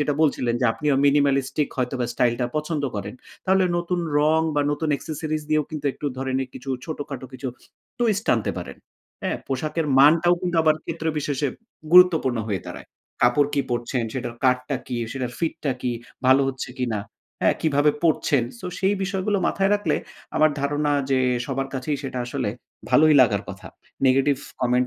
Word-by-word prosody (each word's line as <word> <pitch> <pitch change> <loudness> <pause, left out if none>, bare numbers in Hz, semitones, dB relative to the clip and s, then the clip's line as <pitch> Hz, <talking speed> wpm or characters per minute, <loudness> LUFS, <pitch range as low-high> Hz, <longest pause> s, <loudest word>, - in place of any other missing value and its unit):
যেটা 145 0 +1
বলছিলেন, 125 -6 +1
যে 125 - +3
আপনি 150 - -6 0.2
minimalistic 140 0 +2
হয়তোবা 125 -1 -1
স্টাইলটা 120 0 +1
পছন্দ 150 0 -2
করেন, 100 +2 -5 0.3
তাহলে 190 0 +3
নতুন 175 +1 -1 0.2
রং 155 +2 +3
বা 145 - +2
নতুন 155 +2 -2
accessories 155 +1 -4
দিয়েও 155 -1 +3
কিন্তু 150 -2 -4
একটু 145 - -6
ধরেন 130 0 -1
এ - - -2
কিছু 130 +2 -7
ছোটখাটো 145 -4 -6
কিছু 130 +1 -5 0.5
twist 220 -3 +1
আনতে 115 - -1
পারেন। - - -7 0.5
হ্যাঁ? - - -1
পোশাকের 150 +4 -1
মানটাও 165 +5 +6
কিন্তু 175 -2 -1
আবার 155 -1 +4
ক্ষেত্রবিশেষে 150 -3 -2 0.4
গুরুত্বপূর্ণ 175 -9 +6
হয়ে 100 -3 -2
দাঁড়ায়। - - -9 0.3
কাপড় 125 +4 +4
কি 140 - +2
পরছেন, 120 0 -1
সেটার 120 -2 -4
কাটটা 125 +2 +2
কী, 125 - -3 0.2
সেটার 125 -2 -4
ফিটটা 155 -4 -1
কি, 125 - 0 0.3
ভালো 130 +2 +6
হচ্ছে 130 -2 -4
কিনা, 120 -4 -1 0.4
হ্যাঁ? - - +3
কিভাবে 150 -1 +3
পড়ছেন? 150 -4 +2 0.2
সো - - -6
সেই 195 +1 +2
বিষয়গুলো 195 +1 -1
মাথায় 195 0 +1
রাখলে 205 -7 0 0.4
আমার 155 0 +5
ধারণা 145 +1 0 0.2
যে, 135 - +3 0.3
সবার 135 0 -2
কাছেই 135 +3 -2
সেটা 130 -2 -4
আসলে 120 - -2 0.4
ভালোই 155 +4 +6
লাগার 110 -6 +3
কথা। - - -8 0.4
Negative 135 +1 +3 0.2
comment 125 0 +2
145 Hz, 160 wpm, -23 LUFS, 130-155 Hz, 0.5 s, মানটাও